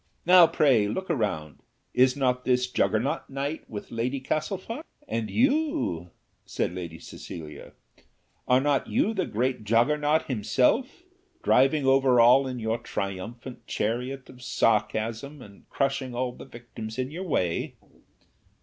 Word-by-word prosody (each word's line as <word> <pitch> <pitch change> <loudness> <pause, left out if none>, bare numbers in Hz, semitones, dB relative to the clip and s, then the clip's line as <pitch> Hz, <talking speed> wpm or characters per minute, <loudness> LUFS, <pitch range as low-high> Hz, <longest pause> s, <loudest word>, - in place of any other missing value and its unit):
Now, 180 -1 +8
pray 135 -10 +3
look 190 - -3
around: 90 - -2 0.3
is 130 +2 +4
not 125 -2 +1
this 125 0 +2
Jaggernaut 125 0 0
night 140 +3 -4
with 105 -2 -7
Lady 125 +4 -2
Castlefort?" 190 - -3 0.2
"And 115 -1 -2
you," 275 - 0 0.3
said - - -2
Lady 85 -3 -6
Cecilia; 80 -1 -10 0.7
"are 125 0 +5
not 140 0 +1
you 220 - +1
the 190 - -1
great 125 +1 -1
Jaggernaut 145 +8 +2
himself, 130 - +1 0.4
driving 135 +2 +3
over 135 -2 +4
all 125 +3 +6
in 130 -1 -4
your 115 0 -1
triumphant 110 +6 -6
chariot 125 +5 -2
of 125 -1 -14
sarcasm, 115 +3 0
and 105 -5 -15
crushing 135 -2 -1
all 125 0 -1
the - - -12
victims 115 -1 -9
in 130 +1 -2
your 180 +4 -6
way?" 90 - -1
125 Hz, 130 wpm, -26 LUFS, 110-145 Hz, 0.7 s, Now